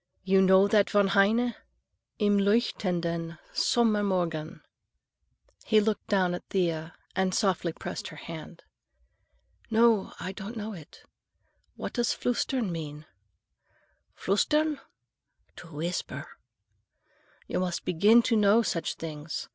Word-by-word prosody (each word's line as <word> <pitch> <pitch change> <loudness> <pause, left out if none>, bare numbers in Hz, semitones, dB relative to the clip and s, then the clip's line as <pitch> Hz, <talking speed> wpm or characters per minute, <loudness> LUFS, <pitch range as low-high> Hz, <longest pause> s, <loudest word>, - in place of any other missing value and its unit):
"You 190 0 +4
know 190 +1 +6
that 205 -1 +3
von 205 -2 +3
Heine? 220 +5 +3 0.6
Im 205 -1 +3
leuchtenden 175 -6 0 0.2
Sommermorgen?" 190 -9 0 1.0
He 220 - +4
looked 215 -1 -1
down 185 -3 +2
at 175 - -5
Thea 165 -4 -1 0.2
and 190 -1 +1
softly 185 -5 +1
pressed - - -6
her 155 - -10
hand. 165 +2 -9 1.1
"No, 225 -2 +3
I 185 - -4
don't 205 +4 -8
know 215 0 -5
it. 160 -6 -13 0.7
What - - -6
does 240 -1 0
flüstern 245 -3 -1
mean?" 155 -2 -6 1.1
"Flüstern?—to 300 - -3
whisper. 155 -2 -4 1.2
You - - -2
must 180 -2 -2
begin 200 +7 +4
now 240 - +6
to 230 - +1
know 210 +1 +5
such 165 -7 -2
things. 155 -1 -6
195 Hz, 115 wpm, -28 LUFS, 170-215 Hz, 1.2 s, know